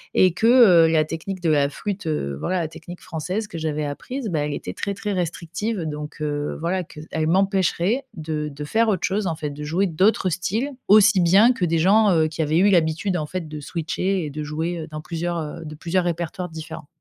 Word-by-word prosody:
Et 185 - +5
que 225 +5 +1
heu, 210 -10 +7
la 160 -1 +3
technique 165 +4 -5
de 170 - +1
la 145 -2 +3
flûte, 200 +3 -5
heu, 70 - -2
voilà 185 - -1
la 165 - -1
technique 170 +2 -11
française 185 +7 -4
que 170 - -7
j'avais 155 -1 -2
apprise, 230 - -5
bah, 165 -4 -1
elle 150 - -3
était 90 - -5
très 200 - -3
très 210 +1 -4
restrictive 180 +4 -3
donc, 150 -1 -6
heu, 145 -1 -2
voilà 180 +3 -1
qu'elle 155 +1 -4
m'empêcherait 195 +5 +1
de 155 -2 -3
de 145 0 -8
faire 225 +9 +2
autre 190 -5 +1
chose 200 +1 -1
en 165 - -1
fait 155 -1 -4
de 145 +1 -7
jouer 170 +6 +1
d'autres 185 +3 +2
styles 200 - -2 0.2
aussi 210 0 +7
bien 195 +7 +6
que 185 - -1
des 165 -1 +1
gens, 205 +5 +5
heu, 160 -2 +3
qui 160 +1 -4
avaient 155 +1 +1
eu 200 +3 +5
l'habitude 175 +1 +2
en 155 - -2
fait 175 +1 -5
de 150 0 -6
switcher 175 +5 -2
et - - -4
de 150 +1 -5
jouer, 160 +3 -3
heu, - - -8
dans 155 0 -6
plusieurs, 170 +2 -3
heu 160 +1 -6
de 155 0 -7
plusieurs 175 +3 -1
répertoires 175 +1 -3
différents. 160 -1 -8
170 Hz, 220 wpm, -23 LUFS, 155-190 Hz, 0.2 s, heu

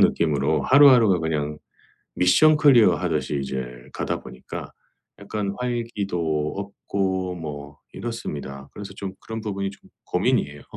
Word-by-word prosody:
느낌으로 75 -2 +2
하루하루가 125 - +6
그냥 75 -2 -2 0.6
미션 150 - +5
클리어하듯이 115 - +3
이제 65 -1 -3 0.3
가다 - - -2
보니까 65 - -9 0.5
약간 100 -2 -3
활기도 100 -11 -2
없고 95 -2 -2
뭐 75 -3 -7
이렇습니다. 70 - -6
그래서 100 -1 -8
좀 95 -1 -5
그런 110 0 -6
부분이 100 -2 -3
좀 100 - -18 0.2
고민이에요. 75 0 0
95 Hz, 300 characters per minute, -24 LUFS, 75-110 Hz, 0.6 s, 하루하루가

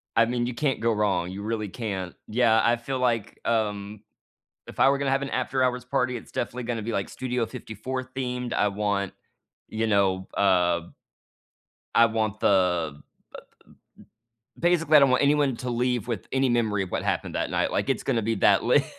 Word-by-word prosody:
I 115 - +5
mean, 120 +1 -1
you 125 - -3
can't 135 +1 -1
go 115 0 +1
wrong, 100 -5 0
you 100 +2 -6
really 110 0 -2
can't. 95 -4 -5
Yeah, 115 -1 +3
I 120 - +4
feel 130 +3 -4
like, 115 -4 -1
um, 105 -2 -1 0.7
if - - -11
I 135 - +6
were 140 - +2
gonna 140 -1 0
have 135 0 +1
an 140 - -3
after 130 0 0
hours 125 -1 0
party, 125 -1 0
it's 115 - -9
definitely 125 +1 -3
gonna 115 -1 -3
to - - -7
be, 115 - -2
like, 100 -3 -2
Studio 125 -2 -2
54 130 +5 -6
themed, 125 -1 -4
I - - +2
want, 100 -1 -1 0.5
you 110 +1 -2
know, 95 -3 +1
uh 90 -3 +3 1.1
I 115 - +7
want 110 -2 -2
the 90 -6 +2
the 75 - -18 1.6
basically, 165 -3 +4
I - - +9
don't 140 -1 +5
want 130 - +3
anyone 140 -2 +3
to 125 +1 -4
leave 120 0 0
with 115 -6 -4
any 135 0 +2
memory 110 -4 +1
of 95 - -7
what - - -1
happened - - -2
that - - -1
night, - - 0
like, - - -1
it's - - 0
gonna 115 - 0
be 115 +1 -1
that 95 - +4
lit. - - +4
115 Hz, 195 wpm, -26 LUFS, 105-125 Hz, 1.6 s, I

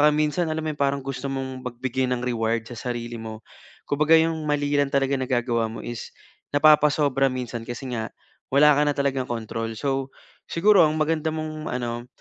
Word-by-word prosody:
minsan, 155 +3 +1
alam 160 0 -2
mo, - - 0
'yung 145 - -16
parang 140 0 +1
gusto 135 0 -4
mong 130 -1 -4
magbigay 130 +1 -2
ng 125 -1 0
reward 115 -2 0
sa 120 - -8
sarili 120 -1 -4
mo. 110 0 -8 0.4
Kumbaga 150 +3 +4
'yung 165 +1 +4 0.2
mali 145 -1 0
lang 145 - +3
talaga 140 0 +2
nagagawa 120 -3 0
mo - - -7
is 120 -2 -6 0.4
napapasobra 145 -2 +4
minsan. 120 -2 -5
Kasi 125 +2 -6
nga 115 -2 -2 0.4
wala 150 +2 +6
ka 145 - +3
na 145 - +2
talagang 135 -2 0
control. 115 -1 -4
So 135 +2 -1 0.4
siguro 195 +2 +5
ang 155 - -1
maganda 160 0 +1
mong 155 -1 -5
ano, 120 -1 -3
135 Hz, 175 wpm, -24 LUFS, 120-150 Hz, 0.4 s, wala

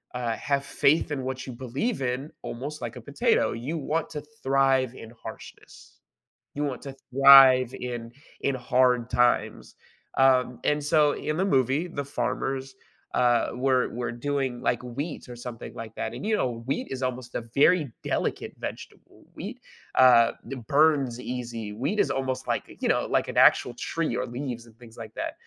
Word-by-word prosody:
uh, 120 -2 -1
have 140 -1 -1
faith 150 +2 +2
in 135 -3 -2
what 130 0 -4
you 130 - -6
believe 130 - -3
in 130 +4 -2
almost 145 +5 -6
like - - -5
a - - -8
potato, - - +1
you 140 +8 -4
want 155 +2 -2
to 150 -2 -5 0.2
thrive 135 -2 +2
in 115 - -10
harshness, - - -12 0.6
you 145 - -1
want 135 -4 -3
to 135 -1 -8 0.2
thrive 135 -2 +8
in 120 -2 -6 0.3
in 140 - 0
hard 125 -1 +2
times. 120 +1 +1 0.4
Um, 130 -2 +3
and 150 0 +1
so 150 0 +4
in 155 - -3
the 190 - +1
movie, 135 +1 +2
the 140 -4 -5
farmers, 135 0 -3 0.4
uh, 120 -1 +3
were 130 0 +2
were 120 0 -4
doing, 130 -1 -2
like, 125 -2 0
wheat 140 +6 -5
or 120 - -7
something 120 -1 -8
like 115 -1 -8
that, 110 - -4
and, 125 - -6
you 220 - +1
know, 115 - -2
wheat 135 - -2
is 130 0 -4
almost 125 -1 -4
a - - -1
very 150 -2 +4
delicate - - -2
vegetable. - - -9
Wheat, - - -7 0.4
uh, 125 -3 +7 0.2
it 130 -5 -7
burns 140 -5 +3
easy. 120 -4 -5
Wheat 140 - -2
is - - +3
almost, 130 -1 -2
like, - - 0 0.2
you - - 0
know, - - +1
like - - +1
an - - -6
actual 120 - +5
tree 155 +1 -2
or 125 - -1
leaves 120 -1 -5
and 115 - -18
things 115 -2 -14
like 115 -2 -9
that. - - -3
130 Hz, 175 wpm, -26 LUFS, 120-140 Hz, 0.6 s, thrive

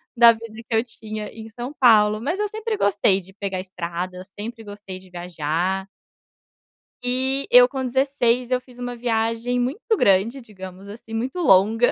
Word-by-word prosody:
da 235 -1 +8
vida 225 -1 -8
que - - -3
eu 225 - +4
tinha 215 -2 -7
em 225 0 -10
São 240 +5 -7
Paulo, 215 -3 +5
mas 335 - -2
eu 420 - +1
sempre 435 +1 -3
gostei 200 - +3
de 190 +1 -15
pegar 195 -2 -4
estrada, 180 -1 -5
eu 185 - -7 0.2
sempre 225 +1 -6
gostei 205 -2 -9
de 185 0 -16
viajar 175 +2 -2 1.2
Eh, 260 +2 0
eu 245 0 +9
com 265 0 -4
16, 250 -2 +1
eu 255 0 +1
fiz 250 -1 -17
uma 245 0 -4
viagem 230 +1 -1
muito 335 - -1
grande, 200 +7 +3
digamos 190 -4 -11
assim, 220 +2 -11
muito 250 +8 -3
longa. 225 - +4
225 Hz, 170 wpm, -22 LUFS, 195-250 Hz, 1.2 s, eu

